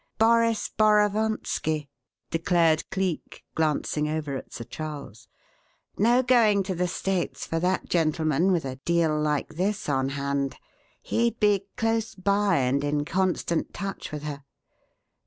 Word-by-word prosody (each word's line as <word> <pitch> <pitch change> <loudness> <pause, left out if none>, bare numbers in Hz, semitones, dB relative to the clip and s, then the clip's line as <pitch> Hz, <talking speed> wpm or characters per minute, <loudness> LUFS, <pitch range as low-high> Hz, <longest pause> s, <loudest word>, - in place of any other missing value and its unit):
"Boris 230 0 +3
Borovonski!" 210 -7 +1 0.4
declared 165 -1 +2
Cleek, 190 -4 -3
glancing 150 -1 0
over 150 -3 -2
at - - -7
Sir 115 - -6
Charles. 140 -3 -8 0.7
"No 240 +5 +3
going 225 -5 +4
to 190 0 -3
the 180 0 0
States 185 +1 -2
for 165 - -2
that 185 +2 0
gentleman 160 +1 +2
with 170 -5 +1
a 130 -1 -5
'deal' 160 0 +1
like 150 0 -1
this 200 +3 -1
on 135 -2 +1
hand. 140 0 -2 0.5
He'd 235 0 0
be 205 -2 +2
close 225 0 0
by 200 +1 +2
and 135 +1 +1
in 145 0 0
constant 180 -1 -1
touch 195 -1 -5
with 150 -1 -5
her. 145 -2 -5
170 Hz, 135 wpm, -26 LUFS, 150-205 Hz, 0.7 s, going